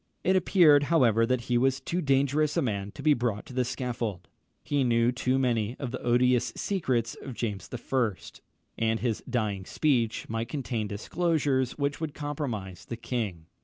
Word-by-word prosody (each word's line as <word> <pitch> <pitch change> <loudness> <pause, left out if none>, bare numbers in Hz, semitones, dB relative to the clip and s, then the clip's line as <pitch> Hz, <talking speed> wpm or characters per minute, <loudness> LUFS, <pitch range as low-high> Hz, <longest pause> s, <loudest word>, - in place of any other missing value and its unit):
It 190 - +3
appeared, 165 -6 +5
however, 115 -8 +3
that 130 -1 +1
he 120 0 +1
was 135 +1 +2
too 170 +6 -2
dangerous 140 +1 +2
a - - +3
man 100 -5 -2
to 140 - -9
be 155 0 +5
brought 120 -5 -2
to - - -11
the 125 0 +1
scaffold. 120 -6 -4 0.4
He 145 -2 +1
knew 115 -1 +3
too 125 +1 0
many 120 -3 0
of 130 -4 -4
the 130 - -5
odious 120 0 +3
secrets 130 - -1
of 130 -4 -7
James 105 -6 -4
I., 125 -2 0 0.7
and 110 0 +1
his 120 -4 -1
dying 105 -6 -1
speech 120 -1 0
might 115 +1 -3
contain 120 -7 -2
disclosures 135 +3 0
which 140 +1 -1
would 155 -3 -3
compromise 120 - -4
the 115 - -6
king. 110 -9 -3
125 Hz, 170 wpm, -28 LUFS, 115-140 Hz, 0.7 s, appeared